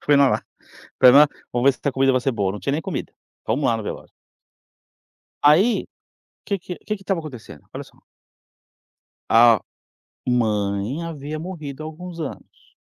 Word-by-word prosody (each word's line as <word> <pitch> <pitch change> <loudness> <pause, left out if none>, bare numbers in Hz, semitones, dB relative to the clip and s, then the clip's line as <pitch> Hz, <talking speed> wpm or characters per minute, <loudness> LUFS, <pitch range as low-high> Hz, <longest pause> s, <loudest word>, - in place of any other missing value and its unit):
Fui 145 -1 +4
na 140 -1 +6
lá. - - 0 0.6
Falei, 125 -1 +8
né: 150 +1 +8 0.3
"Vamos 120 +2 0
ver - - +7
se - - -20
essa 140 - 0
comida 135 0 +3
vai 130 -1 +1
ser 135 - 0
boa". 100 -4 -1
Não 105 - -7
tinha 140 +9 -2
nem 155 - -1
comida. 180 -5 -5 0.3
Fomos 135 +6 0
lá 115 - +2
no 110 - -5
velório. - - -7 1.3
Aí, 170 +11 +4 0.6
que 200 - -1
que 180 +1 -7
que 215 - -1
que 195 - -14
estava 195 -3 -1
acontecendo? 140 -8 -10
Olha - - -6
só - - -21 1.3
a 115 -2 +6 0.7
mãe 110 +2 0
havia 155 -2 -6
morrido 155 -5 -7
há 155 - -5
alguns 170 +2 -8
anos 150 - -9
140 Hz, 170 wpm, -22 LUFS, 120-160 Hz, 1.3 s, Falei